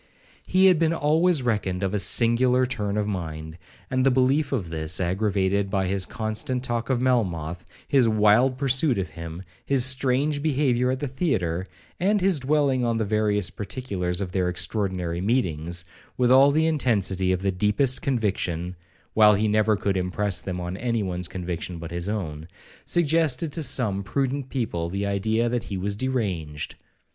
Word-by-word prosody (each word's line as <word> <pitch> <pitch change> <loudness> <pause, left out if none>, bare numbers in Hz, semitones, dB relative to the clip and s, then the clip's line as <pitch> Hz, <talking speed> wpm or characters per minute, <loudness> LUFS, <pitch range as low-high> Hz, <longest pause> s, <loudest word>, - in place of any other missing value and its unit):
He 190 +1 +4
had 185 -4 +5
been 165 0 +2
always 160 0 +2
reckoned 100 -5 -1
of 95 0 -1
a 105 - +1
singular 125 +4 +3
turn 105 -5 -3
of 105 - 0
mind, 80 -4 -5 0.3
and 130 0 0
the 135 - +5
belief 130 +4 +2
of 100 - -2
this, 80 +2 -1
aggravated 95 +1 0
by 95 -1 0
his 95 0 -1
constant 115 +3 -2
talk 120 -1 -2
of 130 -2 +1
Melmoth, 90 -10 -1 0.2
his 130 -5 +3
wild 110 +5 +4
pursuit 135 0 +2
of 95 -3 -2
him, 85 +3 -8 0.2
his 135 -3 +3
strange 135 +3 +1
behaviour 130 -4 +1
at 130 0 -2
the 145 - -1
theatre, 100 - -1 0.3
and 205 +3 +2
his 185 -4 +2
dwelling 135 -2 +1
on 115 -1 0
the 110 - 0
various 105 -2 0
particulars 100 -4 -3
of 95 -2 -4
their 90 -2 0
extraordinary 90 -2 -2
meetings, 85 -6 -1 0.3
with 125 -1 +3
all 135 +2 +7
the 155 +3 +2
intensity 100 - +1
of 95 0 -1
the 100 - +1
deepest 105 +8 +1
conviction, 95 -8 -1 0.4
(while 105 -1 +6
he 110 +2 +1
never 110 0 +2
could 100 -1 -1
impress 90 0 -1
them 90 -2 -4
on 90 +1 -4
any 115 -1 -1
one's 90 -2 -3
conviction 90 -1 -5
but 85 0 -8
his 85 +3 -4
own), 80 -7 -4 0.4
suggested 160 -3 +1
to 160 - -3
some 110 -9 +1
prudent 135 +5 -2
people 85 -11 -2
the 100 +3 -2
idea 110 +4 0
that 120 0 -2
he 100 - -4
was 100 +2 -2
deranged. 100 - -3
105 Hz, 170 wpm, -25 LUFS, 90-130 Hz, 0.4 s, all